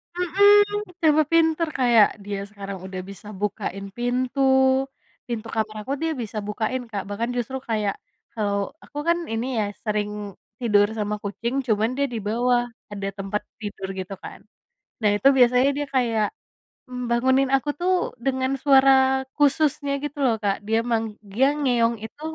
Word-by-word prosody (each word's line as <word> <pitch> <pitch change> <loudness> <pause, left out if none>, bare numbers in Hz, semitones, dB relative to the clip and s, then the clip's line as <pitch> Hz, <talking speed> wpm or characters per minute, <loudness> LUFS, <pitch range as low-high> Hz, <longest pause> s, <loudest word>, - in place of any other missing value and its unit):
Mhm. 400 +4 +6 0.4
Tambah 310 -1 +5
pinter 330 0 +3
kayak 235 -4 +6 0.2
dia 200 0 -4
sekarang 200 -2 -7
udah 190 -1 -5
bisa 200 +1 -11
bukain 200 0 -3
pintu, 245 +2 -1 0.9
pintu 230 -2 -4
kamar 220 -1 -2
aku 265 - -3
dia 325 0 0
bisa 225 -4 -5
bukain, 220 +4 -3
Kak, 200 -3 -3
bahkan 225 +4 -2
justru 245 +2 -2
kayak, 210 -3 0 0.4
kalau 200 -3 -1
aku - - -12
kan 340 0 +4 0.2
ini 235 +1 -1
ya, 210 - +1 0.2
sering 210 -1 -1 0.5
tidur 205 -4 +4
sama 210 0 -1
kucing, 235 +6 -2
cuman 220 0 +2
dia 280 0 +1
di 235 - -4
bawah, 240 +3 +2 0.3
ada 200 -1 -4
tempat 195 +1 -3 0.2
tidur, 205 -2 -5
gitu 190 0 -6
kan. - - -9 0.6
Nah 210 - +4
itu 270 - +5
biasanya 250 +2 +5
dia 290 0 -2
kayak, 230 -4 +2 0.6
mmm, 250 -1 -4
bangunin 260 +3 +3
aku 270 +2 -1
tuh, 365 +1 +2 0.3
dengan 260 0 0
suara 270 -1 +6 0.5
khususnya 290 0 +2
gitu 295 0 -5
loh, 235 -3 +3
Kak, 200 -1 +1
dia 225 +1 +2
meng 225 -1 +1 0.3
dia 255 +7 +3
ngeong 240 -5 +2
itu 225 +6 -10
235 Hz, 155 wpm, -24 LUFS, 210-270 Hz, 0.9 s, Mhm